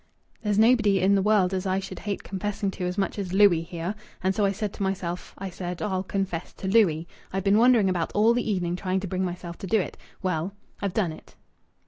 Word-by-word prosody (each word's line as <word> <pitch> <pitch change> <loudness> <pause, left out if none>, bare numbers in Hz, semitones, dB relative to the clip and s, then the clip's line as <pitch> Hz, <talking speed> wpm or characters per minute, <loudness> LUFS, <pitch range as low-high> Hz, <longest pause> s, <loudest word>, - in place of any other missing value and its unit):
There's 210 -2 0
nobody 220 -3 +5
in 190 +2 +4
the 195 - +4
world 195 -2 +3
as 190 +1 -1
I 185 0 +1
should 195 - -7
hate 205 -2 -4
confessing 200 0 -2
to 180 - -4
as 180 +2 -3
much 200 +1 -1
as 185 -2 -4
Louis 195 -4 +6
here, 170 +2 -4 0.3
and 190 +1 +2
so 205 +1 +1
I 195 - +3
said 205 0 -3
to - - -9
myself, 185 -2 -3
I 195 -1 -5
said, 175 -1 -5
'I'll 190 -3 -1
confess 190 -3 -3
to 190 - -6
Louis.' 180 -6 +3 0.2
I've 195 0 -2
been 200 +2 +4
wandering 235 -4 +5
about 175 -3 0
all 220 +3 +5
the 235 -2 0
evening 175 -3 0
trying 185 +1 -1
to 195 - -4
bring 185 +1 -1
myself 175 -1 -5
to 195 - -6
do 220 +4 +3
it.... 185 - -4 0.3
Well, 185 +1 -1 0.3
I've 200 -2 -2
done 190 -7 +1
it." 155 - -13
190 Hz, 230 wpm, -26 LUFS, 180-205 Hz, 0.3 s, Louis